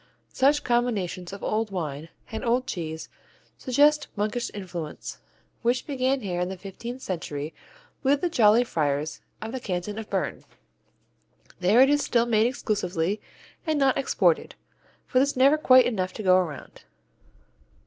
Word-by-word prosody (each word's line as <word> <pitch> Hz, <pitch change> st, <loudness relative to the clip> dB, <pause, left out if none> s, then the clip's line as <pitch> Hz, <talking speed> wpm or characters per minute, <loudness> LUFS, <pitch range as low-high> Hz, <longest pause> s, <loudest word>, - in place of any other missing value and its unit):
Such 285 Hz, +3 st, +3 dB
combinations 210 Hz, -7 st, -1 dB
of 200 Hz, -, -9 dB
old 215 Hz, 0 st, 0 dB
wine 160 Hz, -4 st, -4 dB, 0.2 s
and 220 Hz, -, -4 dB
old 245 Hz, +1 st, +1 dB
cheese 160 Hz, -7 st, -5 dB, 0.5 s
suggest 290 Hz, +3 st, +3 dB
monkish 215 Hz, +3 st, -1 dB
influence, 180 Hz, -6 st, -7 dB, 0.4 s
which 245 Hz, +2 st, +1 dB
began 265 Hz, -1 st, 0 dB
here 180 Hz, -4 st, -2 dB
in 180 Hz, -, -1 dB
the 190 Hz, -, -6 dB
fifteenth 235 Hz, +7 st, -8 dB
century 155 Hz, -4 st, -4 dB, 0.5 s
with 280 Hz, 0 st, +2 dB
the 355 Hz, -, +2 dB
jolly 230 Hz, -6 st, +5 dB
friars 150 Hz, -7 st, -1 dB, 0.2 s
of 220 Hz, -, -5 dB
the 260 Hz, -, -4 dB
Canton 205 Hz, 0 st, -4 dB
of 220 Hz, -, -8 dB
Bern. -, -, -2 dB, 1.2 s
There 195 Hz, +7 st, +5 dB
it 270 Hz, -, +6 dB
is 290 Hz, 0 st, +2 dB
still 235 Hz, -1 st, +2 dB
made 225 Hz, -1 st, +3 dB
exclusively 205 Hz, -5 st, -1 dB, 0.5 s
and 310 Hz, -1 st, +1 dB
not 270 Hz, -2 st, +3 dB
exported, 455 Hz, -, +1 dB, 0.5 s
for 255 Hz, -, +2 dB
there's 280 Hz, 0 st, +1 dB
never 275 Hz, +3 st, +6 dB
quite 255 Hz, -3 st, +7 dB
enough 185 Hz, -6 st, -1 dB
to 215 Hz, -, -6 dB
go 185 Hz, -1 st, +5 dB
around. 165 Hz, -7 st, -3 dB
220 Hz, 150 wpm, -26 LUFS, 180-255 Hz, 1.2 s, quite